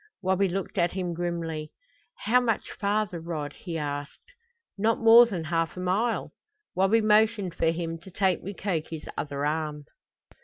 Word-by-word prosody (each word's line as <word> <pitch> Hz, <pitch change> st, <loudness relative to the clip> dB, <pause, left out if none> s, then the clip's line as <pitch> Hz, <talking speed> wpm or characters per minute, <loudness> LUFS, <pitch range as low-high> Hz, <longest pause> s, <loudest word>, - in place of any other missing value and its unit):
Wabi 190 Hz, +1 st, +2 dB
looked 195 Hz, +1 st, -3 dB
at 170 Hz, 0 st, +2 dB
him 180 Hz, -2 st, -2 dB
grimly. 165 Hz, -3 st, -3 dB, 0.5 s
"How 245 Hz, +4 st, +4 dB
much 230 Hz, -3 st, -1 dB
farther, 205 Hz, -3 st, -1 dB
Rod?" 160 Hz, -3 st, -5 dB
he 170 Hz, -3 st, -6 dB
asked. 145 Hz, -, -6 dB, 0.4 s
"Not 220 Hz, +3 st, +1 dB
more 230 Hz, +1 st, +8 dB
than 185 Hz, -7 st, -4 dB
half 165 Hz, +1 st, -1 dB
a -, -, -4 dB
mile." 200 Hz, +6 st, 0 dB, 0.4 s
Wabi 195 Hz, +5 st, +3 dB
motioned 215 Hz, -3 st, +3 dB
for 165 Hz, -, 0 dB
him 165 Hz, 0 st, -3 dB
to 165 Hz, -, -13 dB
take 190 Hz, -1 st, +1 dB
Mukoki's 170 Hz, -5 st, -4 dB
other 140 Hz, -1 st, -3 dB
arm. 150 Hz, -1 st, -2 dB
180 Hz, 150 wpm, -27 LUFS, 165-205 Hz, 0.5 s, more